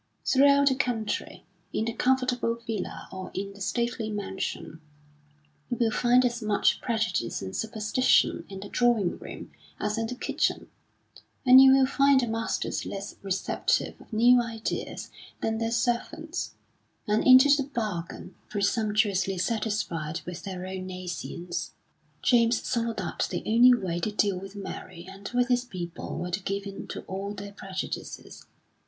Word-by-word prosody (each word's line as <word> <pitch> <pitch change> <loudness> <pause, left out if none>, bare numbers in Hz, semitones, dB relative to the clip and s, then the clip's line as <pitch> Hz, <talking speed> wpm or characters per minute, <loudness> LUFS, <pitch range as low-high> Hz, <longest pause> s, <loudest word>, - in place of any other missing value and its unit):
Throughout 280 +1 +5
the - - +2
country, 245 -5 -2 0.3
in 220 - -1
the 230 - -2
comfortable 250 -1 +1
villa 225 -3 -5
or 190 -1 -6
in 195 +1 -4
the 200 - -14
stately 235 +1 -1
mansion, 190 -5 -4 0.9
you 245 - -2
will 230 -1 +2
find 245 +2 +4
as 240 -1 -1
much 210 -2 +2
prejudice 215 - -1
and 95 0 -6
superstition 220 +3 +2
in 195 -1 -7
the 200 - -8
drawing 235 -7 +2
room - - -9 0.3
as 210 +1 -1
in 225 - -1
the 250 - -5
kitchen; - - -1 0.7
and 255 +1 +10
you 265 0 +8
will 270 0 +5
find 275 +1 +4
the - - 0
masters 225 0 -2
less 200 0 -6
receptive 195 -1 0
of - - -17
new 240 +3 +6
ideas 225 -2 -4 0.3
than 225 0 -1
their 225 0 0
servants; 310 +8 -2 0.5
and 210 +1 +2
into 260 +2 +9
the 280 -1 -2
bargain, 210 -10 -4 0.2
presumptuously 205 -2 +1
satisfied 185 -7 -2
with 180 0 -6
their 185 -2 -6
own 185 0 -5
nescience. 180 -1 -5 0.5
James 235 -1 +4
saw 235 -1 0
that 185 -6 -2
the - - -3
only 245 +3 +6
way 180 -6 -2
to 210 - -1
deal 205 -3 +1
with 195 +1 -10
Mary 185 -3 -8
and 195 +1 -8
with 245 0 +2
his 245 -1 +3
people 180 -7 -6
was 180 0 -4
to 180 - 0
give 200 +1 -3
in 195 -1 -7
to - - -6
all 195 +2 -5
their 200 0 -7
prejudices. 195 -2 -6
215 Hz, 155 wpm, -27 LUFS, 190-240 Hz, 0.9 s, and